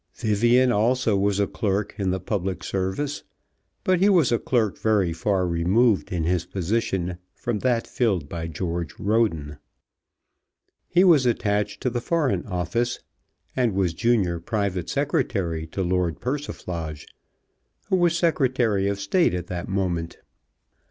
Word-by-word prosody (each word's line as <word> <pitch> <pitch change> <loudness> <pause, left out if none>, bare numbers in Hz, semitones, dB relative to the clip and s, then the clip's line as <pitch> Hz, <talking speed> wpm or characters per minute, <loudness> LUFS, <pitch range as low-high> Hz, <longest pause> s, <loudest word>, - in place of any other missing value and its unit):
Vivian 120 +3 +3
also 115 0 +2
was 100 0 +1
a 100 - +3
clerk 100 +1 -2
in 95 -2 0
the 95 +1 0
public 95 0 -3
service, 95 +10 -2 0.6
but 185 -1 +2
he 195 +3 +4
was 170 -10 +4
a 120 - +2
clerk 115 -6 0
very 100 -6 +2
far 95 +2 0
removed 95 +6 +2
in 85 -3 -1
his 85 +1 +1
position 90 -2 -2 0.2
from 120 -3 -2
that 120 -1 +1
filled 100 - 0
by 80 +2 -5
George 85 -1 -4
Roden. 85 -10 0 1.3
He 175 +2 +4
was 155 -9 +5
attached 105 -2 0
to 125 - 0
the 120 0 -2
Foreign 155 -4 0
Office, 105 +6 -1 0.5
and 120 -6 +1
was 95 -4 +1
Junior 95 -4 +1
Private 95 -1 -2
Secretary 95 - -1
to 95 +4 -3
Lord 90 -3 0
Persiflage, 90 - -4 0.8
who 190 - +3
was 175 -2 +3
Secretary 130 - +1
of 100 0 -1
State 100 - +2
at 90 -1 -3
that 90 -1 -4
moment. 90 -4 -2
100 Hz, 140 wpm, -24 LUFS, 90-120 Hz, 1.3 s, was